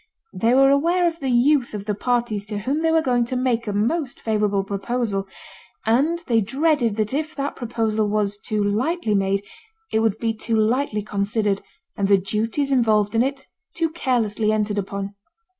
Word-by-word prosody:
They 230 +2 +2
were 270 +1 +6
aware 340 +5 +3
of 335 0 -3
the 270 - -2
youth 250 0 +3
of 200 -1 -6
the 210 - -1
parties 235 -1 -1
to 210 -1 -2
whom 260 +9 -1
they 325 0 +2
were 320 0 +3
going 245 -3 +2
to 255 - -4
make 250 -3 0
a - - 0
most 245 +8 -1
favourable 210 -3 0
proposal; 200 0 -2 0.6
and 275 +10 +2
they 230 -2 +2
dreaded 265 0 +1
that 215 +2 -1
if 310 +2 -2
that 280 0 -3
proposal 220 -3 -1
was 205 -1 0
too 210 +1 -1
lightly 225 - 0
made, 195 0 +1 0.5
it 220 - +2
would 220 -2 +1
be 225 0 -1
too 225 +1 -1
lightly 220 0 +1
considered, 205 0 0 0.3
and 200 - 0
the 200 0 +5
duties 220 +8 -1
involved 220 -5 +2
in 225 - +3
it 270 +1 -2 0.3
too 330 -1 0
carelessly 225 -8 0
entered 210 -1 0
upon. 200 0 -4
225 Hz, 180 wpm, -22 LUFS, 210-270 Hz, 0.6 s, were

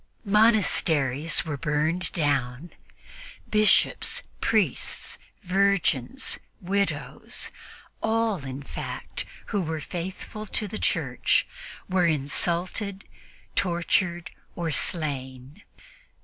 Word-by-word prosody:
Monasteries 170 - +3
were 150 -3 -3
burned 155 +4 0
down; 140 0 0 0.8
Bishops, 215 -1 +3 0.2
priests, - - +1 0.2
virgins, 195 - +1 0.2
widows 200 +1 -2 0.5
all, 220 -6 +1
in 135 +1 -5
fact, - - -5 0.3
who 205 - +2
were 160 -2 -2
faithful 185 +6 -5
to 210 - -2
the 215 - -5
Church - - +2 0.4
were 185 -2 +3
insulted, 175 +6 0 0.5
tortured 175 -1 +1 0.2
or 170 -2 -1
slain. 135 0 -2
175 Hz, 80 wpm, -27 LUFS, 150-200 Hz, 0.8 s, Monasteries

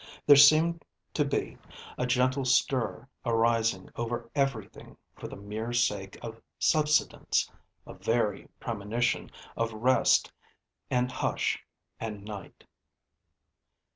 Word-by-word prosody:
There 145 - +9
seemed 155 +4 +6 0.3
to - - +2
be - - -3 0.4
a 125 - -1
gentle 130 +2 +2
stir 130 0 +1 0.2
arising 115 -4 +1
over 120 0 -4
everything, 135 -8 -3 0.2
for - - -8
the - - -9
mere 110 +4 -5
sake 105 -5 0
of 115 -1 -8 0.2
subsidence 150 -1 +1 0.3
a - - -10
very 110 -4 -1
premonition 115 +2 -1 0.3
of 115 0 -1
rest 125 +4 +3 0.6
and 125 0 +1
hush 130 - -1 0.4
and 105 -3 -6
night. 105 -2 -9
120 Hz, 105 wpm, -29 LUFS, 110-130 Hz, 0.6 s, There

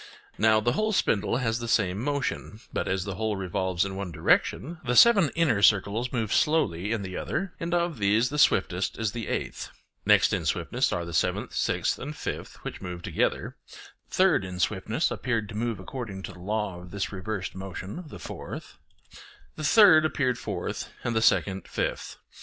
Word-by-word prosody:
Now 110 0 +5
the 120 +3 +1
whole 215 - 0
spindle 110 - +1
has 115 -2 0
the 115 - -5
same 100 -2 +1
motion; 140 -6 -2
but, - - -1
as 95 -1 0
the 100 - -4
whole 110 +1 -1
revolves 95 -1 -1
in 95 -1 -5
one 95 -2 -4
direction, 160 - +1
the 125 -1 0
seven 200 - +7
inner 145 -12 +2
circles 105 +4 +3
move 110 -5 -1
slowly 105 - +1
in 115 -3 -1
the 95 -1 -6
other, 180 +3 -3
and 165 +1 -3
of 170 -6 0
these 105 +4 +3
the 150 +1 -3
swiftest 95 -7 +2
is 110 -2 -1
the 115 -1 -5
eighth; - - -3 0.3
next - - +4
in - - 0
swiftness - - 0
are 85 - -2
the 85 - -7
seventh, 75 - 0
sixth, - - 0
and 150 +4 -6
fifth, - - -5
which - - -6
move 90 -1 -6
together; - - -1 0.5
third 185 - +3
in 90 -1 -6
swiftness 110 - 0
appeared 115 -4 -1
to 110 - -8
move 115 -2 -2
according 95 -2 -6
to - - -6
the 90 - -14
law 100 -1 -3
of 90 - -12
this 100 +1 -3
reversed 100 0 -4
motion 95 - -7
the - - -9
fourth; - - -8 0.8
the 155 - -6
third 180 -1 +7
appeared 130 -5 0
fourth - - -4
and 120 - -1
the 110 - +2
second 95 -3 +2
fifth. - - -3
110 Hz, 185 wpm, -27 LUFS, 95-135 Hz, 0.8 s, seven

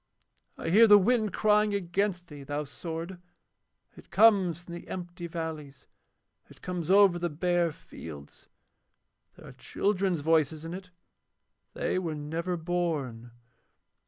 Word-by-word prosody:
I - - -4
hear 220 +6 +7
the 205 -1 +9
wind 215 +1 +2
crying 210 +1 +2
against 190 0 -1
thee, 150 -4 -11
thou 145 +2 -3
sword! 165 +5 -7 0.8
It - - -16
comes 190 -7 +4
from 170 - -10
the 170 - -9
empty 175 -1 -6
valleys. 160 -5 -6 0.6
It - - -18
comes 180 -3 -4
over 195 -2 +5
the 175 0 -1
bare 175 +2 0
fields. 75 - -12 0.9
There - - -15
are - - -10
children's 190 -5 -1
voices 160 0 +1
in 165 - -6
it. 185 0 -8 0.9
They - - -1
were 165 -4 -3
never 165 +4 -3
born. 160 -9 -2
175 Hz, 130 wpm, -28 LUFS, 160-190 Hz, 0.9 s, the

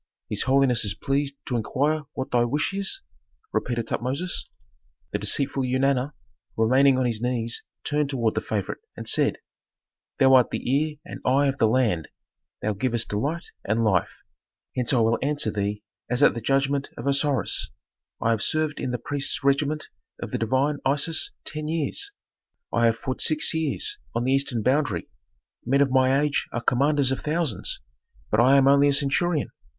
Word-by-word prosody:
"His - - 0
holiness 135 -2 +3
is 105 -2 0
pleased 140 0 -1
to 125 - -2
inquire 145 +7 0
what 130 - -5
thy 120 -1 +3
wish 145 +10 0
is?" 200 - -1 0.5
repeated 120 -2 -1
Tutmosis. 140 +9 -3 0.6
The - - -1
deceitful 140 0 0
Eunana, 130 +2 +1 0.4
remaining 130 +4 +4
on 130 - +1
his 115 -2 -1
knees, 120 -2 -2 0.2
turned 150 -1 0
toward 115 -5 0
the - - -1
favorite, 100 -4 -3 0.2
and - - -7
said, - - +2 0.8
"Thou 135 0 +5
art 125 -2 +6
the - - -4
ear 155 +1 0
and - - -8
eye 135 +3 +3
of 135 -1 -1
the 110 - +4
land; 110 -9 +1 0.6
thou 110 - 0
givest 115 +2 -1
delight 145 +11 -2
and 110 +3 0
life, 105 -4 0 0.5
hence 125 -2 +1
I 125 -4 +3
will 115 +1 +2
answer 145 -5 0
thee 105 0 -2 0.3
as 125 +4 +2
at - - +6
the 115 - -5
judgment 135 +3 +1
of - - -6
Osiris: 140 0 +1 0.5
I 115 - +1
have 110 -2 0
served 155 +2 0
in 130 - -2
the 125 - -1
priests' 145 +2 -1
regiment 145 +2 +1 0.3
of - - -6
the - - -2
divine 130 +5 +1
Isis 145 +4 +1 0.2
ten 155 0 -3
years; 165 - 0 0.6
I 115 - +3
have 115 0 +1
fought 130 +2 -4
six 155 +1 +2
years 285 - -1 0.2
on 115 - 0
the 130 - +1
eastern 135 -5 +1
boundary. 130 - 0 0.5
Men 135 +3 +2
of 140 -2 +3
my 130 +1 +4
age 150 -1 0
are - - -2
commanders 140 +2 +2
of 135 - -1
thousands, 150 - -1 0.5
but 110 - +3
I 130 +4 +6
am 135 0 +5
only 140 +1 +6
a 140 - +3
centurion. 145 +2 0
135 Hz, 175 wpm, -25 LUFS, 120-145 Hz, 0.8 s, art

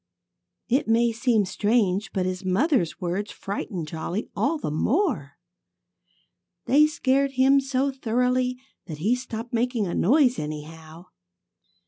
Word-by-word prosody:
It 260 +2 +1
may 230 +1 +3
seem 225 -2 +1
strange, 205 -1 0
but 185 -2 -1
his 185 +1 -3
mother's 190 - +1
words 185 +4 -3
frightened 195 -4 -5
Jolly 170 +7 -4
all 315 +4 +1
the 285 - -4
more. 215 - 0 1.3
They 300 +3 +5
scared 275 -2 +1
him 270 +1 +4
so 270 0 0
thoroughly 250 0 0 0.3
that 155 - -6
he 200 +10 +1
stopped 245 -2 -5
making 235 -2 0
a 175 - -3
noise, 255 - +3
anyhow. 155 +2 -8
225 Hz, 125 wpm, -25 LUFS, 180-260 Hz, 1.3 s, They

